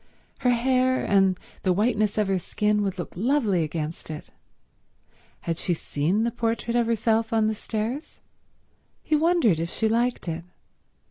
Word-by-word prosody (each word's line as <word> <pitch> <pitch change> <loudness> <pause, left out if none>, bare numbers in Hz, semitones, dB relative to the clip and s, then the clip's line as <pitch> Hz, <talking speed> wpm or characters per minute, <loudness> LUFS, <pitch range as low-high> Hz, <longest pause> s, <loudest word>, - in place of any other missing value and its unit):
Her 250 - +2
hair 255 +1 +2
and 195 -2 +3 0.2
the 185 - +2
whiteness 210 +1 +1
of 210 -2 +2
her 190 -1 +1
skin 210 +3 0
would 195 -2 -2
look 175 - -6
lovely 220 - +2
against 155 0 -4
it. 155 -1 -7 1.1
Had 165 -1 -3
she 175 - 0
seen 165 +8 0
the 235 - 0
portrait 235 0 -1
of 240 -1 +2
herself 225 0 +1
on 220 -1 +3
the 220 - +1
stairs? 225 +7 -4 0.8
He 310 - +1
wondered 305 - +3
if 165 +1 -2
she 220 - 0
liked 235 -1 0
it. 165 0 -3
215 Hz, 155 wpm, -25 LUFS, 185-235 Hz, 1.1 s, and